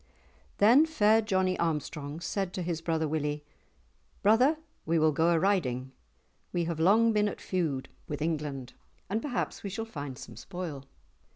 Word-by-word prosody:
Then 245 +10 +6
fair 220 -8 +4
Johnie 190 -3 +1
Armstrong 150 -1 -2
said 190 0 -2
to 185 - -3
his 165 -1 -2
brother 160 -1 0
Willie, 150 -1 -2 0.8
"Brother, 250 +9 +5 0.3
we 165 +1 +1
will 155 0 +4
go 160 +3 +2
a 170 - +4
riding. 140 -9 +1 0.6
We 175 - 0
have 165 -1 -3
long 220 +7 +5
been 210 0 +3
at - - -4
feud 160 -8 -2 0.2
with 145 - -4
England, 150 -5 -3 0.4
and 220 +2 0
perhaps 250 -3 -3
we 200 - -4
shall 225 +4 -4
find 145 - -6
some 140 - -10
spoil." 170 -7 -6
170 Hz, 160 wpm, -29 LUFS, 150-205 Hz, 0.8 s, Then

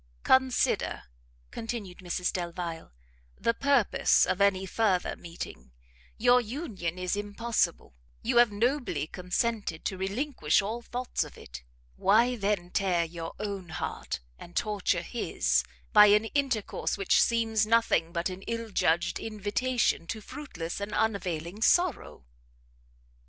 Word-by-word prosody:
"Consider," 260 -1 +2 0.5
continued 220 -6 -5
Mrs 180 -1 -2
Delvile, 170 -2 -5 0.5
"the 230 - +2
purpose 275 -3 +3
of 190 - -1
any 195 -1 +3
further 190 -3 +1
meeting; 65 - -9 0.4
your 245 +2 +5
union 215 - -4
is 180 +1 -1
impossible, 205 - -1 0.3
you 240 +1 +1
have 240 -2 +6
nobly 245 - 0
consented 180 +1 -2
to 190 - -2
relinquish 195 - +1
all 215 +4 -2
thoughts 245 +1 -2
of - - -12
it - - -10 0.4
why 230 +6 +4
then 200 -5 -1
tear 185 -4 +1
your 165 0 -7
own 200 -4 -5
heart, 155 - -4 0.2
and 175 - -12
torture 200 -5 0
his, 235 +6 0 0.3
by 210 -1 +9
an 210 +2 +5
intercourse 265 -10 -1
which 195 -2 +3
seems 225 -2 +2
nothing 225 -7 +3
but 170 0 -1
an 185 0 -6
ill 230 -1 -3
judged 170 -2 +1
invitation 215 -2 -1
to 220 - -4
fruitless 200 - -6
and 200 +1 -4
unavailing 185 -3 -1
sorrow?" 350 - +2
205 Hz, 125 wpm, -29 LUFS, 180-230 Hz, 0.5 s, by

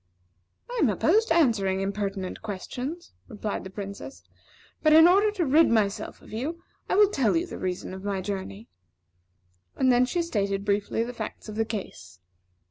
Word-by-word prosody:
"I - - -4
am - - +4
opposed 445 +2 +2
to 330 - +2
answering 210 - +2
impertinent 195 -1 -3
questions," 250 - -6
replied 210 -3 -4
the 190 - -8
Princess; 200 +6 -8 0.6
"but 310 -1 +4
in 320 +2 +9
order 400 +4 +5
to 365 -5 0
rid 305 +4 +5
myself 210 -3 0
of - - -14
you, 305 +10 -4 0.3
I - - +2
will 410 0 +5
tell 270 - +2
you 335 - 0
the - - -8
reason 185 0 -4
of 190 0 -8
my 200 -1 -2
journey." 185 - -5 1.1
And 250 -1 +3
she 350 - -1
then - - -3
stated 200 -8 -1
briefly 205 +2 0
the 245 +1 -6
facts 220 -1 -7
of 210 - -7
the 225 0 0
case. 210 - -7
220 Hz, 175 wpm, -26 LUFS, 200-320 Hz, 1.1 s, in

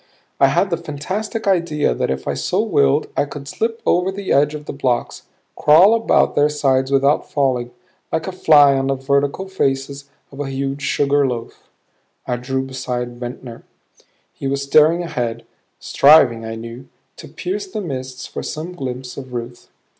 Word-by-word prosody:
I 135 - +6
had 185 +8 +1
the 170 - +1
fantastic 185 +8 -5
idea 170 - +1
that - - -2
if 65 0 -3
I - - 0
so - - -1
willed 70 -1 +2
I - - +1
could 140 0 -9
slip 225 +8 -3
over 180 +2 +2
the 195 0 -5
edge 145 +2 +3
of 150 0 -8
the - - -6
blocks, 130 -3 -2 0.3
crawl 175 +8 +6
about 230 0 +2
their 145 +1 +3
sides 135 -3 +1
without 140 +2 +2
falling 130 -4 0 0.4
like 160 - -1
a 190 - -4
fly 150 -6 +5
on 135 0 0
the 135 - +1
vertical 140 +7 -1
faces 140 -5 -2 0.2
of 140 - -12
a 145 -2 -3
huge 135 +1 -3
sugar 140 0 +1
loaf. 120 -2 -7 0.6
I 125 - -2
drew 130 +2 -2
beside 125 -2 -5
Ventnor. 120 -1 -8 0.7
He 135 - -5
was 140 +1 -1
staring 155 +5 +4
ahead, 120 -8 -4 0.3
striving, 135 -6 +5
I 110 0 -5
knew, 115 +3 -9 0.3
to - - -10
pierce 395 +2 -4
the 375 - -5
mists 130 -7 -6
for - - -6
some 165 +4 -6
glimpse 130 -5 -6
of 130 -2 -8
Ruth. 120 0 -7
140 Hz, 170 wpm, -19 LUFS, 130-155 Hz, 0.7 s, I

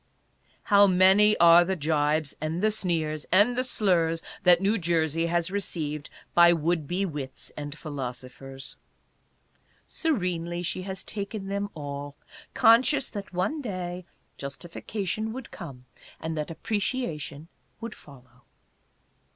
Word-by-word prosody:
How 205 -1 +6
many 190 +3 +5
are 170 0 +8
the 190 +2 -1
jibes, 150 -1 0
and 160 +4 -2
the 215 - +4
sneers, 160 -7 -1
and 205 +7 +5
the 255 - +1
slurs 170 -9 +1 0.2
that 180 -1 +6
New 200 +4 +1
Jersey 165 -1 +1
has 170 +1 0
received 155 -7 -3 0.2
by 170 0 +7
would 165 -1 0
be 185 +5 0
wits 145 -6 -5
and 145 0 -6
philosophers! 135 -2 -7 1.1
Serenely 180 - -2
she 180 - -3
has 190 0 -5
taken 200 -1 -5
them 200 +1 -2
all, 145 -1 -6 0.4
conscious 250 +4 +4
that 200 -2 -6
one 190 - -1
day 185 -6 -5 0.4
justification 190 +9 -4
would 260 -1 -8
come 135 -7 -9 0.3
and 160 0 -4
that 150 +1 -3
appreciation 165 - -3 0.3
would 230 -1 -6
follow. 125 -3 -17
175 Hz, 125 wpm, -27 LUFS, 150-200 Hz, 1.1 s, are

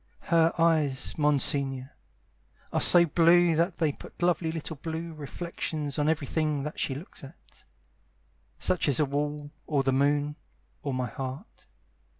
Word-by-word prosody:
Her 165 0 +5
eyes, 155 -5 +1
Monsignore, 140 -3 +1 0.8
Are - - +1
so 175 -1 +8
blue 170 +1 +4
that 170 +2 0
they 160 -3 +1
put - - -14
lovely 175 -2 +1
little 160 -1 -6
blue 165 +3 -5
reflections 155 -1 -5
On 150 +1 +2
everything 155 -1 -1
that 150 +1 -6
she 135 - -1
looks 150 +2 -9
at, 135 - -15 0.9
Such 180 - +1
as 140 -4 +2
a 150 - +3
wall 145 +1 -3 0.2
Or 145 -3 +1
the 135 0 +1
moon 145 +2 +1 0.4
Or 140 - -3
my 130 -1 -1
heart. 135 - -8
150 Hz, 145 wpm, -27 LUFS, 140-165 Hz, 0.9 s, so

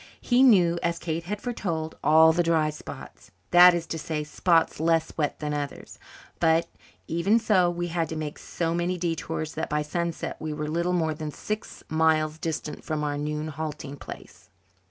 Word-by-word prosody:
He 245 +1 +2
knew, 180 -9 +5
as 170 0 0
Kate 165 0 -3
had 205 +3 -3
foretold, 170 -10 -3
"all 160 +1 +6
the 175 - +2
dry 160 -2 +2
spots" 150 - -10 0.2
that 175 0 +8
is 170 -1 -2
to 165 - -5
say, 155 -1 -3
spots 165 +2 +1
less 165 0 +1
wet 150 -3 -1
than 150 -1 -3
others. 145 -1 -5 0.4
But, 165 0 +3 0.4
even 170 +7 +2
so, 205 -6 +3
we 175 0 -3
had 165 -2 -1
to 160 - -4
make 155 -1 -5
so 165 -1 -2
many 175 +1 -1
detours 165 -2 -3
that 160 - -3
by 150 0 0
sunset 170 +2 -3
we 155 -1 -4
were 150 0 -4
little 170 +3 0
more 160 -3 +1
than 155 0 -5
six 215 +8 -6
miles 155 -1 +2
distant 160 -2 -4
from 155 -2 -2
our 145 -1 -1
noon 150 +1 -3
halting 150 -2 -6
place. - - -11
160 Hz, 180 wpm, -26 LUFS, 155-175 Hz, 0.4 s, that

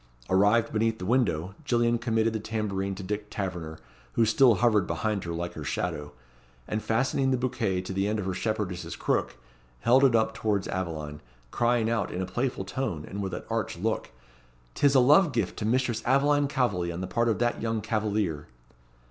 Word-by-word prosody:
Arrived 105 +5 +3
beneath 110 +1 +1
the 90 - -6
window, 95 -7 +1
Gillian 120 -3 +2
committed 115 -1 +1
the 110 - -1
tambourine 100 -3 -2
to 95 - -7
Dick 105 +2 -4
Taverner, 90 -5 -4 0.4
who 115 - +3
still 115 +2 +5
hovered 105 -3 +3
behind 100 +4 -2
her 85 - -4
like 85 +1 -4
her - - -7
shadow, 75 0 -3 0.6
and 105 - -2
fastening 130 +4 +1
the 130 - +2
bouquet 110 -7 -1
to 95 - -5
the 95 +1 0
end 105 +1 0
of 105 - -3
her 95 - -1
shepherdess's 90 -5 -3
crook - - -1 0.5
held 130 - +5
it 130 -4 +5
up 110 0 +2
towards 105 -3 -1
Aveline, 80 -5 -4 0.3
crying 120 -1 +2
out, 115 -3 0
in 90 - -4
a - - -2
playful 120 0 -2
tone, 95 - -3
and 100 - -5
with 95 -2 -3
an - - -6
arch - - -2
look, - - -2 0.6
"'Tis 140 - +3
a - - +8
love 150 +7 +5
gift 110 -6 -1
to 105 - -2
Mistress 120 -1 +1
Aveline 145 +2 +3
Calveley 110 -11 0
on 85 +2 -5
the - - -2
part 115 +4 0
of 110 - +1
that 120 0 0
young 115 -1 -1
cavalier." 105 -8 -1
110 Hz, 190 wpm, -27 LUFS, 95-120 Hz, 0.6 s, a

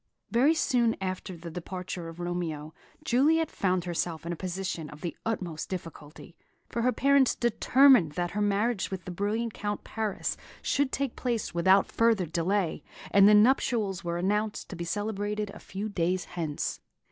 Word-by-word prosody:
Very 275 +7 +4
soon 240 -6 +2
after 185 -1 -4
the 170 0 -8
departure 180 0 -6
of 165 +1 -11
Romeo, 165 -3 -3 0.3
Juliet 310 +5 +3
found 185 -2 0
herself 170 -1 -2
in 170 - -2
a - - -4
position 180 -3 -4
of 150 +1 -12
the 170 - -4
utmost 180 -8 -3
difficulty; 165 -2 -8 0.3
for 235 - -2
her 250 +2 +3
parents 275 +2 +3
determined 240 - +5
that 175 +1 -2
her 210 - -2
marriage 205 +1 +1
with 190 -3 -6
the 180 - -5
brilliant 210 +5 -1
young - - -14
Count 205 0 -2
Paris 220 -3 -3 0.3
should 285 -1 +1
take 275 -3 -2
place 235 -4 -2
without 190 +3 +4
further 230 -5 +3
delay, 170 +1 0 0.3
and 200 0 +7
the 210 - +7
nuptials 210 -4 +3
were 170 0 -2
announced 210 +4 -1
to - - -6
be 170 0 -5
celebrated 205 +2 -2
a - - -11
few 200 +3 -5
days 180 -2 -1
hence. 160 -4 -3
195 Hz, 170 wpm, -28 LUFS, 175-225 Hz, 0.3 s, and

